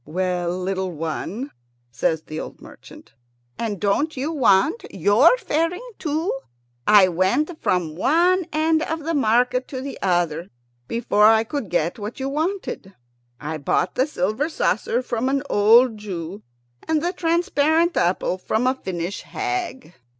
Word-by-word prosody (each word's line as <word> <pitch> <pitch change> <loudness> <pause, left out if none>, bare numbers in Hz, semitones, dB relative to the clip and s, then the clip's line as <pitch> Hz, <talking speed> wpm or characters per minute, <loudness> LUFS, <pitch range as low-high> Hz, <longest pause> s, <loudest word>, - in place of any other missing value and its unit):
"Well, 180 +2 -2
little 190 0 -2
one," 170 - -4 0.4
says 155 +7 -1
the 155 0 -6
old - - -8
merchant, - - -15 0.5
"and 215 -4 -3
don't 270 +10 0
you 280 +5 -2
want 265 - +3
your 205 - +4
fairing 360 +1 -1
too? 315 +3 -1 0.5
I 205 -3 +7
went 220 - 0
from 170 -4 0
one 345 - +3
end 315 +1 +2
of 320 0 -3
the 330 +2 -2
market 250 -1 +2
to 260 - -6
the 275 +1 -7
other 175 -2 0 0.4
before 215 -2 +3
I 220 0 +5
could 230 -3 -4
get 175 +3 -1
what 210 +5 -6
you 265 +1 -2
wanted. 310 - -3 0.4
I 155 +1 -5
bought 140 - 0
the 260 - +1
silver 220 - -1
saucer 240 - 0
from 245 +1 -1
an 275 0 0
old 225 +2 +5
Jew, 190 -1 -6 0.5
and 315 -1 +1
the 350 +1 0
transparent 335 -1 +1
apple 180 +1 0
from 220 +5 -1
a 255 - +3
Finnish 185 -6 -5
hag." 365 - -4
230 Hz, 145 wpm, -22 LUFS, 185-310 Hz, 0.5 s, I